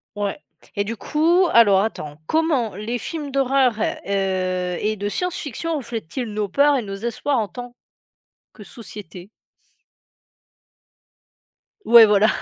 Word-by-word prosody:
Ouais 205 +4 -3 0.4
et 200 - +2
du 225 +3 -4
coup, 335 - +2
alors 205 -5 +6
attends, 150 -9 -4
comment 295 - 0
les 215 +5 -3
films 295 +4 -5
d'horreur, 270 -2 +2
heu 185 -3 -1
et 215 +1 0
de 205 0 -3
science-fiction, 330 - -3
reflètent-ils 240 - -5
nos 210 -1 -1
peurs 280 +7 +3
et - - -1
nos 195 -3 -6
espoirs 235 +6 -2
en 215 -3 0
tant, 245 +5 -9 0.8
que 215 - -13
société? 195 -5 -11 2.6
Ouais, 230 -1 +8
voilà. 210 0 +4
225 Hz, 125 wpm, -21 LUFS, 200-270 Hz, 2.6 s, Ouais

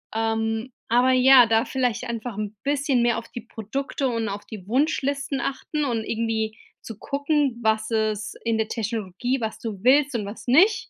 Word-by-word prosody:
Ähm, 225 +2 -1 0.2
aber 245 +3 +4
ja, 255 0 +7
da 225 +1 +2
vielleicht 250 -3 -1
einfach 235 -2 -5
'n 215 0 -4
bisschen 285 -2 +1
mehr 235 -1 +2
auf 230 - -6
die 240 - -7
Produkte 240 +5 -4
und 230 -3 -1
auf 200 +1 -6
die 205 -5 -9
Wunschlisten 280 +2 0
achten 295 +3 -3
und 230 -4 -1
irgendwie 220 -1 -2 0.2
zu 225 -2 -9
gucken, 285 -2 0
was 220 0 +1
es 215 -2 -1
in 230 -1 +1
der 220 -1 0
Technologie, 225 +2 -2
was 220 -2 -3
du 210 -5 -6
willst 275 +1 +4
und 215 -3 -1
was 205 +5 -9
nicht. 370 - +4
230 Hz, 175 wpm, -24 LUFS, 220-265 Hz, 0.2 s, ja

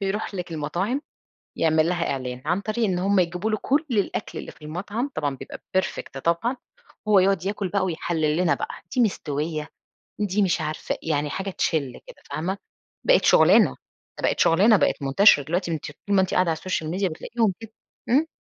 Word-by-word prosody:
بيروح 200 +1 -2
لِك 180 -2 -5
المطاعم 175 - -2 0.6
يعمل 160 0 +3
لها 175 -1 0
إعلان، 125 -1 -5
عن 175 +5 0
طريق 220 +2 -1
إن 185 -3 0
هم 195 +1 +2
يجيبوا 180 +4 -1
له 215 - +1
كُل 290 +4 +2
الأكل 205 -5 -1
اللي - - -7
في - - -23
المطعم، 205 - -4
طبعًا 145 -3 -1
بيبقى - - -9 0.2
perfect 185 -7 -3
طبعًا، 170 +10 +1 0.5
هو 205 -2 +6
يقعد 190 -1 +2
ياكل 200 -1 -2
بقى 195 0 0
ويحلّل 160 -3 -1
لنا 175 -1 +3
بقى، - - -4 0.3
دي - - +4
مستوية 155 -7 -1 0.5
دي 205 0 +1
مش 175 -3 +1
عارفة 155 0 -3
يعني 150 -2 -1
حاجة 195 +4 -3
تشلّ 150 -8 -1
كده - - -12
فاهمة، 185 +6 -2 0.5
بقِت - - +4
شغلانة، - - +6 0.5
دي - - -11
بقت - - -1
شغلانة، 200 +7 +5
بقِت 170 - +1
منتشرة 145 +3 +5
دلوقتي 175 +4 -1
أنتِ 155 - -3 0.2
طول 200 0 +2
ما - - +6
أنتِ 185 - -1
قاعدة 180 -2 +3
على 160 - 0
الSocial 160 -3 -3
Media 195 +1 +1
بتلاقيهم 225 +6 -1
كده، 225 -1 -10 0.4
إمم. 295 +7 +3
180 Hz, 185 wpm, -24 LUFS, 155-205 Hz, 0.6 s, هو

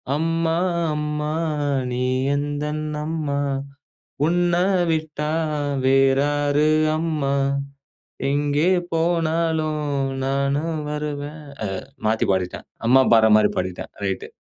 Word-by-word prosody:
"அம்மா 165 +1 0 0.4
அம்மா 150 0 -2 0.6
நீ 125 +1 -1 0.3
எந்தன் 150 +1 -2 0.2
அம்மா, 155 -3 -2 0.9
உன்னை 175 +1 +2 0.3
விட்டா 155 -1 -2 0.6
வேறாரு 145 +2 +3 0.3
அம்மா. 155 -4 -1 1.0
எங்கே 145 +4 +2 0.2
போனாலும் 160 -2 0 0.4
நானும் 140 +4 0
வருவேன். 150 0 -4 0.5
அ - - -24 0.2
மாத்தி 110 +1 +2
பாடிட்டேன். 90 -1 -2 0.2
அம்மா 130 +2 +6
பாடுற 110 -1 +6
மாதிரி 105 -1 +5
பாடிட்டேன். 90 -1 -3 0.2
ரைட்டு. 95 -1 -2
150 Hz, 85 wpm, -22 LUFS, 140-160 Hz, 1.0 s, அம்மா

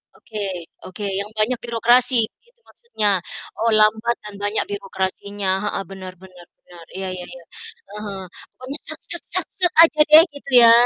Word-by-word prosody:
oke 215 -1 -9 0.5
oke, 185 +3 -8 0.2
yang 205 - -5
banyak 230 +3 0
birokrasi 240 +2 +3 0.3
gitu 475 0 -32
maksudnya, 470 - -2 0.5
oh 230 +1 +1
lambat 220 +2 +2
dan 210 -1 -8
banyak 205 +1 0
birokrasinya, 195 0 -4
heeh, 205 -1 -2
benar 185 -1 -9
benar 180 -2 -15
benar, 170 -2 -16
iya 190 0 -4
iya 180 -1 -7
iya, 175 - -12 0.5
eee, 210 - -8
heeh. 195 -2 -6 0.3
Pokoknya, 260 +4 -6
sat 315 0 -5
set 345 - -1
sat 370 -2 +2
set, 355 -1 +4
aja 315 -2 +2
deh 315 +2 +9
gitu 275 -1 -10
ya, 230 - +9
215 Hz, 165 wpm, -21 LUFS, 195-255 Hz, 0.5 s, deh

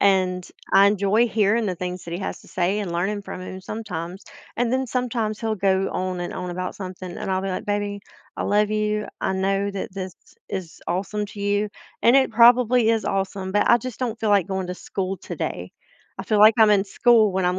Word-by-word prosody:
and 185 -2 +2 0.2
I 200 +1 +7
enjoy 205 +3 +3
hearing 220 0 +2
the 185 - -1
things 180 +1 -5
that 170 - -7
he 180 - -4
has - - -4
to - - -17
say 185 +3 0
and 190 -5 -3
learning 200 +4 -1
from 185 - -7
him 185 +1 -7
sometimes, 185 -3 -6 0.3
and 240 0 0
then 260 0 +1
sometimes 230 -3 -2
he'll 220 -1 -1
go 190 0 +1
on 185 -1 -3
and 175 - -4
on 180 -1 -5
about 180 +1 -4
something, 185 -2 -7
and - - -5
I'll 190 0 0
be 195 - -2
like, 185 - -3
"Baby, 205 0 -2 0.4
I - - -2
love 210 +1 +2
you, 210 0 -1
I - - 0
know 195 +1 0
that 195 -1 -5
this 190 -2 -6 0.3
is 185 -4 -6
awesome 200 +4 -2
to 200 0 -10
you, 205 +1 +1 0.3
and 235 - +6
it 270 -2 +4
probably 240 0 +5
is 225 -3 +1
awesome, 195 -1 -2
but 205 +2 +2
I 240 - +7
just 255 0 -7
don't 235 -3 -2
feel 215 -2 +1
like 200 -4 +4
going 190 -2 -3
to 180 - -3
school 190 +1 -4
today. - - -5 0.5
I - - -3
feel 215 - +1
like 215 +1 +8
I'm 215 -1 +7
in 200 -1 +4
school 220 0 +4
when 190 0 0
I'm 180 +1 +1
200 Hz, 220 wpm, -23 LUFS, 185-215 Hz, 0.5 s, like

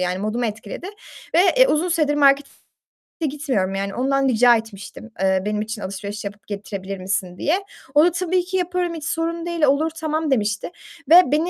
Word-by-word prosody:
yani 180 0 -1
modumu 215 +4 -1
etkiledi 215 - -6 0.5
ve, 340 - +6 0.2
eee, - - +7
uzun 325 0 +1
süredir 310 -4 +1
markete 280 -1 +4 0.8
gitmiyorum 260 -10 -1
yani 195 0 -3
ondan 270 +2 +1
rica 245 -1 +5
etmiştim, 225 0 -7
eee, 190 -1 +2
"Benim 210 0 -1
için 215 0 -5
alışveriş 200 +2 -6
yapıp 200 -1 -8
getirebilir 200 -1 -6
misin?" 185 -1 -3
diye. 365 +6 0 0.3
O 300 - +7
da 355 - +3
"Tabii 365 +1 0
ki 375 +1 -2
yaparım, 360 -1 -1
hiç 305 - -7
sorun 330 +1 -2
değil, 340 -2 -3
olur, 295 +3 +3
tamam." 315 -1 -1
demişti 215 +2 0 0.4
ve 350 +2 +10
beni 315 +4 +2
260 Hz, 180 wpm, -21 LUFS, 205-325 Hz, 0.8 s, ve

